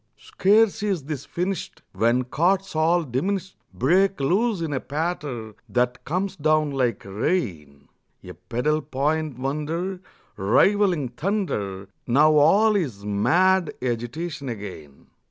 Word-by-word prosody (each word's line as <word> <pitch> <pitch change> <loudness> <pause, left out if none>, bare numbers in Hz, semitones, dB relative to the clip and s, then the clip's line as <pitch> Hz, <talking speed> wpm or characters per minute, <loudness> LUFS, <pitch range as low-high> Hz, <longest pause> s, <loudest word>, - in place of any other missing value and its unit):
Scarce 215 +2 +2
is 195 -7 -1
this 145 -1 -5
finished 180 0 -4
When 115 +6 +2
chords 180 +8 0
all 165 +2 +3
diminished 185 +9 -2 0.2
Break 180 - +2
loose 195 +9 +1
in 160 -3 -2
a 135 - 0
patter 145 -8 -4 0.2
that 125 0 0
comes 185 +5 -2
down 155 -2 +2
like 130 -4 -1
rain, 95 - -3 0.4
A - - -9
pedal 150 +6 -1
point 150 0 -1
wonder 155 +8 -3 0.4
Rivaling 175 - +3
thunder. 120 - -3 0.2
Now 150 +6 +5
all 200 +9 +5
is 125 - -2
mad 175 - +2
agitation 130 +5 -4
again. 95 - -9
150 Hz, 120 wpm, -24 LUFS, 120-185 Hz, 0.4 s, Now